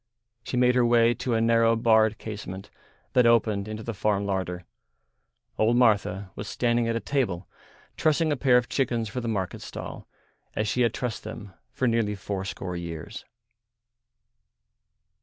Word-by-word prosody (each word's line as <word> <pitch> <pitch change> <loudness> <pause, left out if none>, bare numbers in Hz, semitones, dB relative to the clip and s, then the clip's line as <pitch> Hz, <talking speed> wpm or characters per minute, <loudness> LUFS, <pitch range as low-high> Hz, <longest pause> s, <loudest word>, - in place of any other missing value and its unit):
She 125 - -3
made 125 0 +4
her 125 -1 +3
way 120 0 +4
to 125 -1 -2
a 110 - +2
narrow 115 0 +4
barred 110 -1 +3
casement 100 -3 -7 0.4
that 125 -2 +5
opened 110 -3 +2
into 110 0 -6
the 115 - -4
farm 100 0 0
larder. 95 -2 -3 0.9
Old 115 +2 +3
Martha 100 -5 +2
was - - -6
standing 120 -1 +1
at 115 - 0
a - - 0
table 110 -11 -1 0.5
trussing 155 0 +2
a - - +2
pair 130 -2 +4
of 125 -1 0
chickens 120 -5 -1
for 125 +5 -4
the 120 - -4
market 95 -5 -2
stall - - -8 0.5
as 105 - 0
she 110 +4 0
had 115 -2 +2
trussed 125 -3 -3
them 105 -2 -8 0.2
for 130 0 0
nearly 115 -3 +1
fourscore 95 -2 -4
years. 85 -2 -7
115 Hz, 160 wpm, -26 LUFS, 100-120 Hz, 0.9 s, that